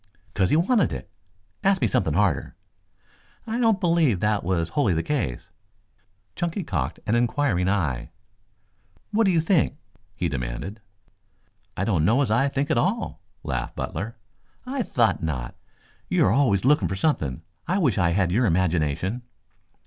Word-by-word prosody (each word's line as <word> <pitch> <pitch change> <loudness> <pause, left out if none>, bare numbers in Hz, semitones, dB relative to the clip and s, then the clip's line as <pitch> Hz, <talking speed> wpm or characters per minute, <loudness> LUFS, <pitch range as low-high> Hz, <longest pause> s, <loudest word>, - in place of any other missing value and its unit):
"'Cause 95 -2 +1
he - - +3
wanted 190 - +3
it. - - -7 0.5
Ask 195 0 +3
me - - +2
something - - 0
harder." - - +1 0.9
"I 230 +1 -2
don't 225 -4 +3
believe 165 - +2
that 105 +1 +1
was 85 -2 0
wholly 100 - +1
the 80 - 0
case." 115 - -3 0.8
Chunky 175 +3 -2
cocked - - -3
an 110 - 0
inquiring 120 -6 +1
eye. 80 -12 -1 1.0
"What 225 +1 +3
do 190 - +4
you 170 - +3
think?" 160 -3 +2 0.4
he 90 - -1
demanded. 70 - -5 1.0
"I 95 - 0
don't 95 -7 +1
know 115 - +3
as 120 - -2
I 125 +5 +3
think 140 +1 -1
at 120 - +3
all," 205 - -1 0.2
laughed 60 -2 -3
Butler. 115 +3 -4 0.5
"I 260 +1 -2
thought 115 - +1
not. 65 -7 -3 0.6
You - - +3
are - - +3
always 120 -5 +2
looking 150 +3 +4
for 95 - -3
something. 80 - -1 0.2
I 180 +3 +1
wish 135 - +2
I 85 -3 +3
had 95 -2 +1
your 115 +5 +2
imagination." 90 - 0
110 Hz, 155 wpm, -24 LUFS, -, 1.0 s, do